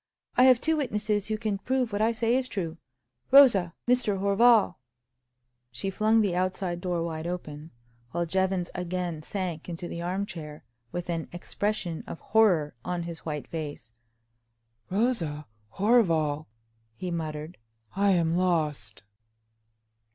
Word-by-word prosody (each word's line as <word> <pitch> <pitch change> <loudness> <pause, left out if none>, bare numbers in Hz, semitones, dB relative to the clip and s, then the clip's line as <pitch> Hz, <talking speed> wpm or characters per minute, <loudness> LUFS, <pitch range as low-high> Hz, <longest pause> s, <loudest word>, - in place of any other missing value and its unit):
"I 250 - +6
have 255 -2 +7
two 320 +3 +1
witnesses 210 -6 -1
who 215 0 -1
can 215 -2 -2
prove 255 -1 -1
what 205 - 0
I 225 +1 +4
say 230 +1 +1
is 260 0 +1
true. 170 -8 -4 0.5
Rosa! 235 - +6
Mr. 245 -5 +2
Horval!" 200 -1 +4 0.9
She 130 +12 -3
flung 215 +3 +3
the 195 -4 +1
outside 180 -1 -1
door 175 -2 -1
wide 160 -1 -4
open, 155 -3 -6 0.4
while 170 +3 -1
Jevons 190 0 0
again 180 -3 -3
sank 180 -1 -4
into 175 0 -5
the 170 - -5
arm 185 +3 -1
chair, 150 -5 -9 0.3
with 175 0 -4
an 165 -2 -3
expression 175 -1 -3
of - - -7
horror 185 -9 +3
on 180 -1 -2
his 170 -1 -6
white 150 -2 -4
face. 150 -7 -6 1.0
"Rosa! 185 -9 0 0.3
Horval!" 165 -9 +2 0.5
he 180 +8 -5
muttered. 155 0 -5 0.4
"I 200 +1 +3
am 165 -2 +2
lost!" 155 - -1
180 Hz, 135 wpm, -27 LUFS, 165-210 Hz, 1.0 s, have